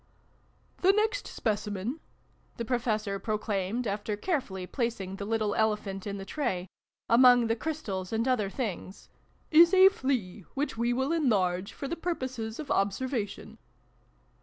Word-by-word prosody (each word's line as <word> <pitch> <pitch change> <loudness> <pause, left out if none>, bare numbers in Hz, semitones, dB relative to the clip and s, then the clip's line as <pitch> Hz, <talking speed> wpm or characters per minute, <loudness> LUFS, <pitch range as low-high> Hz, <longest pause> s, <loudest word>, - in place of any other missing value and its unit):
" - - -33
The 380 +2 +6
next 435 +4 0
Specimen," 210 +4 -2 0.6
the 235 - -3
Professor 215 -5 -1
pro 215 +1 -1
claimed, 210 +3 -2
after 205 0 -2
carefully 210 - -2
placing 195 -4 -3
the 200 - -5
little 215 -1 0
Ele 220 -1 +3
phant 195 -1 -7
in 200 0 -3
the 195 - -7
tray, 195 -10 -2 0.4
among 245 0 +6
the 225 0 +1
Crystals 225 -11 -4
and 225 +2 0
other 230 -6 +1
Things, 195 -4 -5 0.2
" - - -37
is 345 +3 +6
a 380 +1 +9
Flea, 250 - -2
which 285 -1 -1
we 235 +1 0
will 265 +4 0
enlarge 200 - +1
for 275 - -6
the 335 - -2
purposes 260 -10 -3
of 295 -2 -5
observation." 205 +2 -2
225 Hz, 155 wpm, -29 LUFS, 200-265 Hz, 0.6 s, a